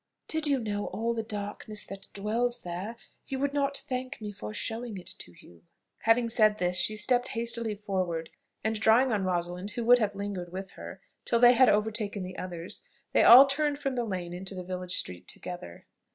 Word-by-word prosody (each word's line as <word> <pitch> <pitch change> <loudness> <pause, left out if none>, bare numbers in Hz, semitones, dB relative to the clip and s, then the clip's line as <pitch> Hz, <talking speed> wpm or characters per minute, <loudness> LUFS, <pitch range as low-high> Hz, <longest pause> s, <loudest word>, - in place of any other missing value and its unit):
"Did 315 -1 0
you 280 -2 +3
know 205 -4 -3
all 230 +1 -1
the 230 - -2
darkness 210 0 -4
that 195 0 -9
dwells 235 +4 -1
there, 180 +6 -5 0.3
you 270 - -3
would 280 +1 -1
not 280 -1 0
thank 260 -1 -4
me 210 -2 -5
for 105 - -7
showing 225 - -3
it 185 0 -9
to 85 - -9
you." 85 -1 -17 0.4
Having 230 +1 +4
said 215 -2 +4
this, 180 -2 0
she 215 +4 +2
stepped 245 +4 +2
hastily 230 -2 -1
forward, 185 -5 -3 0.3
and 220 0 0
drawing 230 +4 +4
on 205 -3 0
Rosalind, 180 +1 -2
who 235 +2 -4
would 245 +1 +7
have 205 -3 0
lingered, 195 -3 -5
with 190 +1 -6
her, - - -10 0.2
till 235 - +2
they 240 +1 +8
had 255 +1 +6
overtaken 210 -1 0
the 185 0 -7
others, 175 -1 -4 0.3
they - - +5
all 255 +4 +10
turned 290 +1 0
from 275 -2 -2
the 245 -1 -1
lane 180 -5 -4
into 190 +2 -5
the 185 - -5
village 180 0 -3
street 90 0 -4
together. 175 - -7
210 Hz, 195 wpm, -29 LUFS, 185-240 Hz, 0.4 s, all